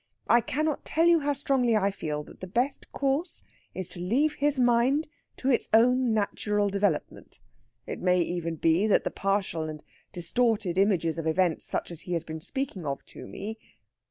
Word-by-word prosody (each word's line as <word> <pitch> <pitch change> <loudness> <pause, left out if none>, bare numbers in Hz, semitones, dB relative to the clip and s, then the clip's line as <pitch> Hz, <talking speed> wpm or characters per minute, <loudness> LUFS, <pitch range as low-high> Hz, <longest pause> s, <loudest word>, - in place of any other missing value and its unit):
I 235 - +5
cannot 300 +6 -1
tell 325 +2 +1
you 340 -1 +6
how 290 -1 0
strongly 265 -4 +1
I 200 -1 +1
feel 150 -5 -4
that - - -15
the 185 - -7
best 245 +9 -2
course 280 +5 -1 0.3
is 185 -2 -4
to 175 - -10
leave 260 +13 +1
his 290 -2 +1
mind 250 +5 +3 0.3
to 265 - +1
its 240 - +1
own 250 +2 +4
natural 210 -1 0
development. 195 -5 -2 0.5
It - - -5
may 180 0 +3
even 170 -1 -2
be 165 +6 +2
that 210 - +3
the - - -2
partial 190 -5 -1
and 155 -1 -8 0.3
distorted 195 0 0
images 170 -5 +2
of 160 - -3
events 170 0 +1
such - - -2
as 170 -1 -6
he 180 - -5
has 170 -1 -1
been 160 -1 -7
speaking 265 - -2
of 140 -2 -4
to - - -9
me...." 220 +3 -7
205 Hz, 185 wpm, -27 LUFS, 175-255 Hz, 0.5 s, you